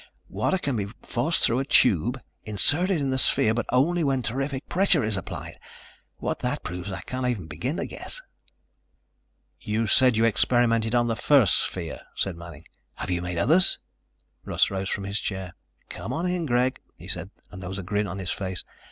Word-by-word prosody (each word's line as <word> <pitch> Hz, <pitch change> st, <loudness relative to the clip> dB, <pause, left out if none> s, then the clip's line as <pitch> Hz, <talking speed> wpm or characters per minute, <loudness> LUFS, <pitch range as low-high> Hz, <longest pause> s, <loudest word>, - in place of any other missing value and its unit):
Water 190 Hz, -, 0 dB
can 140 Hz, -9 st, -1 dB
be 100 Hz, -2 st, -2 dB, 0.2 s
forced 155 Hz, +8 st, 0 dB
through 120 Hz, +2 st, +3 dB
a -, -, 0 dB
tube 125 Hz, -, +3 dB, 0.2 s
inserted 160 Hz, -, +2 dB
in 135 Hz, -2 st, -1 dB
the 130 Hz, -, +1 dB
sphere, 110 Hz, -3 st, +3 dB
but 120 Hz, -, -2 dB
only 165 Hz, +7 st, +3 dB
when 135 Hz, -3 st, +1 dB
terrific 135 Hz, +3 st, -3 dB
pressure 180 Hz, -6 st, +3 dB
is 110 Hz, -1 st, -1 dB
applied. 95 Hz, -, -6 dB, 0.6 s
What -, -, -3 dB
that -, -, -2 dB
proves 90 Hz, +3 st, -5 dB
I 95 Hz, -3 st, -4 dB
can't 130 Hz, +8 st, -3 dB
even 110 Hz, -9 st, -2 dB
begin 85 Hz, -, -3 dB
to -, -, -2 dB
guess." -, -, -7 dB, 1.4 s
"You 110 Hz, +1 st, -1 dB
said 125 Hz, +2 st, +5 dB
you 115 Hz, -, +4 dB
experimented 115 Hz, 0 st, +2 dB
on 120 Hz, 0 st, +3 dB
the 115 Hz, -1 st, 0 dB
first 125 Hz, -4 st, +5 dB
sphere," -, -, -2 dB
said 95 Hz, -3 st, -1 dB
Manning. 85 Hz, -2 st, -11 dB, 0.3 s
"Have -, -, -4 dB
you 90 Hz, -1 st, +1 dB
made 90 Hz, -1 st, -3 dB
others?" 160 Hz, -, +4 dB, 0.7 s
Russ -, -, +1 dB
rose 95 Hz, 0 st, -2 dB
from 100 Hz, -, -2 dB
his 100 Hz, +1 st, -2 dB
chair. 95 Hz, -2 st, -4 dB, 0.4 s
"Come -, -, -5 dB
on 165 Hz, +3 st, -2 dB
in, 180 Hz, -3 st, -1 dB
Greg," 125 Hz, +1 st, +1 dB, 0.2 s
he -, -, -12 dB
said, -, -, -4 dB, 0.2 s
and 95 Hz, -, -9 dB
there 90 Hz, -, -6 dB
was 95 Hz, -, -5 dB
a 100 Hz, -, -5 dB
grin 105 Hz, +3 st, -1 dB
on 90 Hz, -, -5 dB
his 95 Hz, -2 st, -3 dB
face. 95 Hz, -3 st, -4 dB
115 Hz, 190 wpm, -26 LUFS, 95-135 Hz, 1.4 s, said